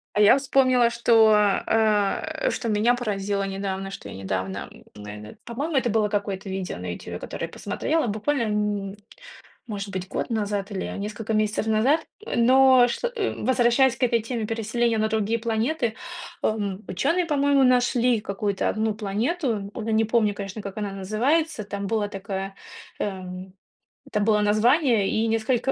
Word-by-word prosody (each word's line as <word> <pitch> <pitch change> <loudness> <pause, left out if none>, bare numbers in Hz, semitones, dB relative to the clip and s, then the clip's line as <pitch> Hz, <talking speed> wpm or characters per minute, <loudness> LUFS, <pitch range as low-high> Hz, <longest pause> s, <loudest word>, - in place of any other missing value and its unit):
А - - +1
я 210 +4 +7
вспомнила, 255 -3 +3
что, 230 -2 +4 0.3
э, 215 - +1
что 235 - -3
меня 220 +3 +3
поразило 200 -4 -2
недавно, 195 0 -4
что 100 - -8
я - - -8
недавно, 95 0 -4
м, - - -16
наверное, 105 +1 -9
по-моему 285 +7 -3
это 250 -2 +1
было 215 -1 +1
какое-то 200 -1 -3
видео 190 -1 -4
на - - -5
"Ютубе", - - -7
которое - - -5
я - - -10
посмотрела, 320 -5 -1
буквально, 230 +6 -1
м, 210 -2 -2 0.7
может 205 -3 -5
быть 185 -1 -5
год - - -3
назад, 205 -3 -2
или 190 - -3
несколько 210 +2 -4
месяцев 215 0 0
назад, 245 +9 +2 0.3
но 255 +1 +6
что 485 - -2 0.3
возвращаясь 250 0 +3
к - - -13
этой 235 -2 +3
теме, 225 0 -3
переселения 225 +1 0
на 215 0 +1
другие 220 +1 0
планеты, 230 +2 -1 0.5
эм, 205 -2 -2
учёные, 335 - 0
по-моему, 285 -3 +2
нашли 245 -2 +3
какую-то 200 -1 -2
одну 220 0 0
планету. 215 - -2
Уже 220 +2 -4
не 220 0 +3
помню, 215 -2 +2
конечно, 200 +1 -6
как 200 -2 -7
она 210 -2 -3
называется. 230 - 0
Там 200 0 -5
было 210 0 0
такое 195 -1 -5 0.4
эм 185 -1 -5 0.5
это 210 - -1
было 210 0 +3
название, 225 - +3
и 225 +1 +1
несколько 225 +3 +1
215 Hz, 155 wpm, -24 LUFS, 200-240 Hz, 0.7 s, я